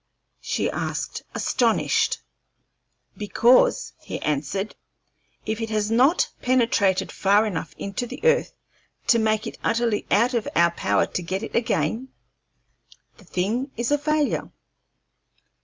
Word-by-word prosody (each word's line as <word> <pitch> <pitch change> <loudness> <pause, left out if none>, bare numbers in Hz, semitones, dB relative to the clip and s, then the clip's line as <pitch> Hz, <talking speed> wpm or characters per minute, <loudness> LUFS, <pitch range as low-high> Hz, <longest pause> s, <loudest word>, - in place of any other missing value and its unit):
she - - -1
asked, - - -3
astonished. 230 -3 +1 0.9
"Because," 230 +4 +3
he - - -6
answered, 155 +8 -2 0.7
"if 220 +1 -2
it 225 - -3
has 215 0 -1
not 265 +10 +3
penetrated 230 -7 +2
far 200 +3 +3
enough 165 -7 -4
into 200 +5 -4
the - - -8
earth 480 +1 +3 0.5
to 235 - +4
make 215 0 +1
it 225 - -7
utterly 230 -2 0
out 235 +5 +3
of 235 -3 -1
our 170 0 +4
power - - +1
to - - -4
get 190 +4 -3
it - - -6
again, 235 +1 0 1.1
the 205 - -18
thing 215 - -1
is 235 +3 -1
a 290 - +4
failure." 305 0 0
220 Hz, 125 wpm, -24 LUFS, 200-245 Hz, 1.1 s, to